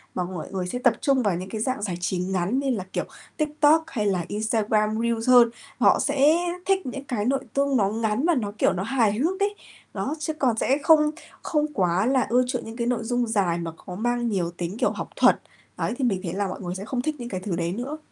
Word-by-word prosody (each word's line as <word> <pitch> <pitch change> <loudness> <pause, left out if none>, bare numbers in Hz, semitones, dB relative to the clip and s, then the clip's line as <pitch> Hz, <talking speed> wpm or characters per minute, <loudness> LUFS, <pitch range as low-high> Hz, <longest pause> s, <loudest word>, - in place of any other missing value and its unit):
mà 180 - 0
mọi 175 -3 -6
người 185 -2 -3
sẽ 245 +7 -3
tập 245 -2 +4
trung 270 -3 +2
vào 200 -4 +1
những 185 +2 -6
cái 220 - -4
dạng 255 -1 -1
giải 190 -4 -2
trí 180 +1 -1
ngắn 185 +6 0
như 275 -1 -1
là, 220 -7 -1
kiểu, - - 0 0.3
TikTok 305 +1 +3
hay 225 -9 -2
là 185 -4 0
Instagram 215 0 0
Reels 235 0 0
hơn. 245 -2 +7 0.3
Họ - - +5
sẽ 285 +2 +4 0.3
thích 385 0 +1
những 270 +2 -5
cái 240 -7 -2
nội 270 +2 +1
tung 280 -1 +2
nó 200 -3 +2
ngắn 220 +4 0
và 345 -1 +3
nó, 210 -6 -1
kiểu, - - +3
nó 185 0 -2
hài 230 -2 +2
hước 320 - 0
đấy. 405 +1 0 0.4
Đó, 295 - -2
chứ 310 +1 -2
còn 260 -7 +1
sẽ 270 +4 +2
không 300 -2 +5 0.3
không 300 -1 -1
quá 185 -3 +1
là 260 +1 +2
ưa 250 +2 +4
chuộng 250 -1 -3
những 225 - -8
cái 235 -1 -1
nội 245 -2 0
dung 245 +1 0
dài 195 -6 +1
mà 165 -1 -4
có 180 - -6
mang 240 +3 0
nhiều 180 -6 -1
tính, 175 +3 -5
kiểu, - - +2
học - - -6
thuật. - - +5 0.4
Đấy, - - -1
thì 275 - -2
mình 200 -6 +1
thấy 170 -2 -3
là 200 +1 -1
mọi 185 - -6
người 180 -1 -4
sẽ 195 +2 -6
không 245 +2 -2
thích 310 +4 -2
những 240 -1 -6
cái 185 - -3
thứ 185 -1 -3
đấy 170 0 -1
nữa. 255 +8 -4
230 Hz, 250 wpm, -25 LUFS, 195-270 Hz, 0.4 s, hơn